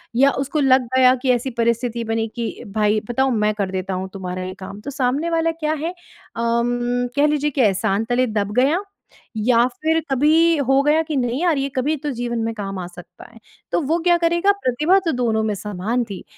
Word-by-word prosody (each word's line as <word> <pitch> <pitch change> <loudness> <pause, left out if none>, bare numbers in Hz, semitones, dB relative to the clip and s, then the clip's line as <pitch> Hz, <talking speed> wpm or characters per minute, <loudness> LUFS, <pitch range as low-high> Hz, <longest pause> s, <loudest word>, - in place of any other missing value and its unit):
या 275 +3 +5
उसको 295 +3 -2
लग 260 -2 +4
गया 255 0 +6
कि 260 - +3
ऐसी 245 +2 -2
परिस्थिति 235 0 0
बनी 225 0 -1
कि 235 -1 -5
भाई 210 0 +2
बताऊँ 265 +2 +1
मैं 210 0 +1
कर 200 -3 -2
देता 190 0 -3
हूँ 185 +1 -4
तुम्हारा 185 -1 -5
ये 185 0 -5
काम, 195 +1 -8
तो 275 - -6
सामने 275 +4 0
वाला 330 0 +1
क्या 310 -1 -2
है? 315 +2 -3
उम, 245 -6 -2
कह 290 +1 +4
लीजिए 295 0 +1
कि 270 - 0
एहसान 200 0 +1
तले 250 +1 +2
दब 200 0 -2
गया, 295 +8 +2 0.6
या 235 +2 +3 0.2
फिर 320 +1 +2
कभी 315 +5 +4
हो 270 +1 +4
गया 300 +2 +3
कि 310 -1 -4
नहीं 245 +2 -1
यार 345 -4 +2
ये 275 0 -1
कभी 290 +5 +1
तो 295 - -1
जीवन 240 -1 -2
में 225 0 -2
काम 195 -2 -5
आ 180 - -4
सकता 175 0 -13
है। 230 - -16 0.3
तो - - +1
वो 325 +3 +2
क्या 350 -1 +5
करेगा 345 +3 +2
प्रतिभा 300 +10 +3
तो 330 - +2
दोनों 230 -4 0
में 215 -1 0
समान 210 +4 -2
थी 195 - -7
245 Hz, 215 wpm, -21 LUFS, 220-300 Hz, 0.6 s, गया